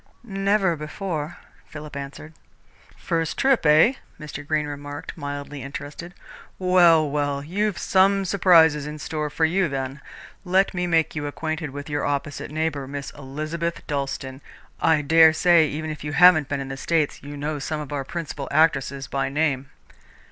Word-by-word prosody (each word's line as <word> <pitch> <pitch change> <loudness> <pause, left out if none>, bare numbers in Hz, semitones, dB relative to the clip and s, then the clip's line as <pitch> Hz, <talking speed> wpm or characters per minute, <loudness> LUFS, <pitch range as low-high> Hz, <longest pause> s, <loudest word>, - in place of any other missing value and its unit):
"Never 195 -3 +1
before," 155 +1 -5 0.3
Philip 150 -1 -9
answered. 140 +3 -8 0.6
"First 165 -1 -2
trip, 270 -2 +3
eh?" 155 - +6 0.3
Mr. 150 -1 -7
Greene 155 -1 0
remarked, 145 0 -7
mildly 145 0 -6
interested. 145 +6 -8 0.4
"Well, 175 -4 +5
well, 145 -1 -1
you've 200 +5 -1
some 195 +1 +3
surprises 165 -6 +4
in 150 0 -6
store 150 0 -3
for 160 +2 +1
you, 180 +1 +1
then. 135 +1 -4 0.4
Let 190 +2 +2
me 180 -1 -1
make 165 -2 +1
you 145 -1 -3
acquainted 155 +1 -4
with 145 +1 -8
your 145 -1 -2
opposite 145 0 -3
neighbour, 150 -3 -2
Miss 140 0 -6
Elizabeth 155 +5 -5
Dalstan. 135 -2 -4 0.4
I 160 -2 +3
dare 160 +2 +6
say, 170 -1 +4
even 155 +2 -4
if 155 - -8
you 150 -1 -4
haven't 175 -4 +6
been 145 -1 -2
in 135 - -6
the 135 - -5
States, 155 +1 0
you 145 +1 -8
know 150 +1 -3
some 155 +3 -3
of 150 -1 -6
our 140 -1 -2
principal 150 -2 -5
actresses 140 -4 +2
by 135 +2 -2
name." 140 -2 -1
150 Hz, 160 wpm, -23 LUFS, 145-170 Hz, 0.6 s, eh